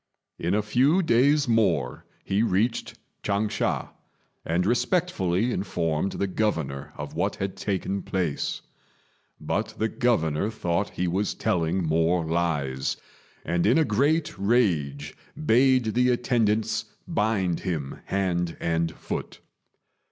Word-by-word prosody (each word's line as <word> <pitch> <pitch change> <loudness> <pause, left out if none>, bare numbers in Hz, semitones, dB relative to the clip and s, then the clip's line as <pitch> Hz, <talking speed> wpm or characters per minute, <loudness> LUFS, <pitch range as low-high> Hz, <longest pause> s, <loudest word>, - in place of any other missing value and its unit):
In 85 +4 0
a 105 - +1
few 135 - +3
days 140 +2 +3
more 90 - +1 0.2
he 100 +2 +1
reached 115 +2 0 0.2
Ch'ang 100 +1 0
sha, 105 - -1 0.5
and 85 +2 0
respectfully 120 - +1
informed 85 -3 -1
the 100 - -1
Governor 80 -9 -2
of - - -6
what - - -1
had 95 0 -3
taken 100 0 -2
place; 90 -6 -2 0.8
but - - -2
the 110 - +1
Governor 100 -8 +1
thought 95 -3 -1
he 90 - 0
was 95 +4 -1
telling 90 +1 0
more 80 +2 +2
lies, 75 -6 -1 0.5
and 85 +3 +1
in 120 - +5
a 160 - +4
great 145 +8 +1
rage 85 - +1 0.3
bade 125 -2 +4
the 125 +1 +3
attendants 115 -3 +1 0.2
bind 100 -5 0
him 80 -7 -4
hand 90 -3 -1
and 85 0 0
foot. - - -5
95 Hz, 120 wpm, -26 LUFS, 85-115 Hz, 0.8 s, in